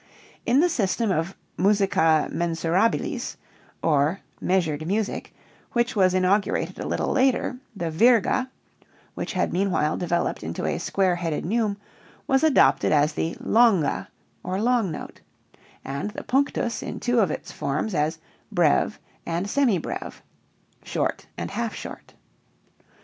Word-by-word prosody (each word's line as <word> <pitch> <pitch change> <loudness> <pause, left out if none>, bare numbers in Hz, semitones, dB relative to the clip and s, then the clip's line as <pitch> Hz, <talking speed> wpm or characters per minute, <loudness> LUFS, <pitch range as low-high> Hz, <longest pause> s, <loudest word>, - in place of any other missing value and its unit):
In 250 +5 +5
the 355 - +4
system 225 - 0
of 165 +2 -1 0.2
"musica 190 -5 +3
mensurabilis" 170 +5 0 0.5
or 155 +3 +2 0.2
measured 160 -5 0
music 205 +3 -2 0.4
which 240 +1 +1
was 185 -2 +3
inaugurated 185 +2 +1
a - - -4
little - - -1
later, 260 -1 +1 0.2
the 170 -4 -3
virga 235 +7 +3 0.6
(which - - -4
had - - 0
meanwhile 180 -5 +1
developed 175 -1 -1
into - - -4
a - - -1
square 185 -3 +1
headed 165 -3 -2
neume) 210 +1 0 0.5
was 270 +2 +2
adopted 315 -3 +4
as 150 0 +3
the 165 +2 -2
longa 220 -9 +3 0.3
or 185 +1 -3
long 235 -3 +2
note, 155 - -8 0.6
and 140 +8 -3
the 210 - -7
punctus 265 -3 0
in - - -5
two 245 -1 +1
of 195 -6 +3
its - - -5
forms 155 +10 -2
as 155 +1 0 0.3
breve 175 +2 +2 0.3
and 170 +3 -2
semi 240 -3 +2
breve 165 - -6 0.6
(short - - -2
and - - -4
half - - -3
short). - - -9
190 Hz, 135 wpm, -25 LUFS, 165-230 Hz, 0.6 s, In